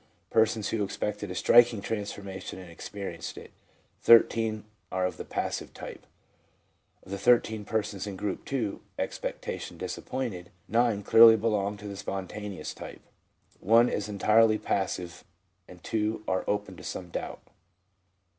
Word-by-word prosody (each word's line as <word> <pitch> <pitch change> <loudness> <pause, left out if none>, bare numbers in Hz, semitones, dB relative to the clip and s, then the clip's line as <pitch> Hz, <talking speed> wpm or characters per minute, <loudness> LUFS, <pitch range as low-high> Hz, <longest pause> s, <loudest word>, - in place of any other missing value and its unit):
(persons 110 -1 +2
who 110 -2 0
ex 100 - -5
pected 105 -1 -3
a 90 - -5
striking 120 +2 +5
transformation 100 -3 -5
and 90 -2 -10
experienced 85 0 -7
it), - - -10 0.5
13 115 -2 +5 0.3
are 95 0 0
of 90 - -3
the - - -5
passive - - -4
type. - - -9 1.0
Of - - -13
the 100 - -3
13 110 -1 +3
persons 105 -2 -2
in 100 - -5
Group 100 +5 -4
II. 115 -7 -1 0.2
(expectation - - -4
disappointed), 100 -10 -4 0.2
9 115 -3 +2
clearly 115 +2 +9
belong 105 -2 0
to 105 +1 -9
the 100 - -6
spontaneous 95 +1 -5
type, - - -10 0.6
1 115 +4 +5
is 105 0 -2
entirely 110 +2 +4
passive, 95 -4 -2 0.4
and 90 -1 -14
2 110 0 -1
are 95 - 0
open 105 -2 -2
to - - -11
some 90 -2 -6
doubt. - - -5
105 Hz, 140 wpm, -28 LUFS, 95-110 Hz, 1.0 s, clearly